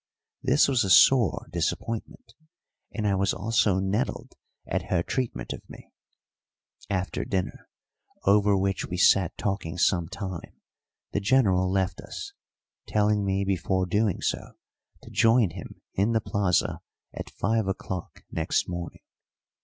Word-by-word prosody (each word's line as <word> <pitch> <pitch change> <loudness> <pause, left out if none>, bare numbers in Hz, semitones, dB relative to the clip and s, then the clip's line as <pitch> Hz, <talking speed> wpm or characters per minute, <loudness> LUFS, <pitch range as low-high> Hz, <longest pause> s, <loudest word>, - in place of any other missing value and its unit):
This 130 +3 +4
was 130 -3 +2
a 95 - -2
sore 115 - +5
disappointment, 90 +7 -3 0.6
and 110 - -3
I 100 - +2
was 95 0 +1
also 105 -1 +2
nettled 95 +5 -2 0.3
at - - -2
her 85 -2 +1
treatment 115 - -3
of - - -9
me. - - -13 1.0
After 95 -1 -2
dinner, 95 -2 -3 0.5
over 100 0 +4
which 95 0 -1
we 90 - -4
sat 95 -1 +4
talking 95 -4 -3
some 85 -2 +2
time, 95 -2 -7 0.5
the - - 0
General 100 -4 +3
left 95 -1 0
us, 400 -1 -8 0.5
telling 105 -1 +2
me 100 0 0
before 95 0 0
doing 100 +1 0
so - - -2 0.5
to - - -12
join 115 -4 +4
him 85 +1 -10
in 105 +4 +1
the 110 - +3
plaza 100 -5 0 0.3
at - - -6
five 110 0 0
o'clock 95 -2 -5
next - - 0
morning. 85 -2 -6
100 Hz, 135 wpm, -26 LUFS, 90-105 Hz, 1.0 s, sore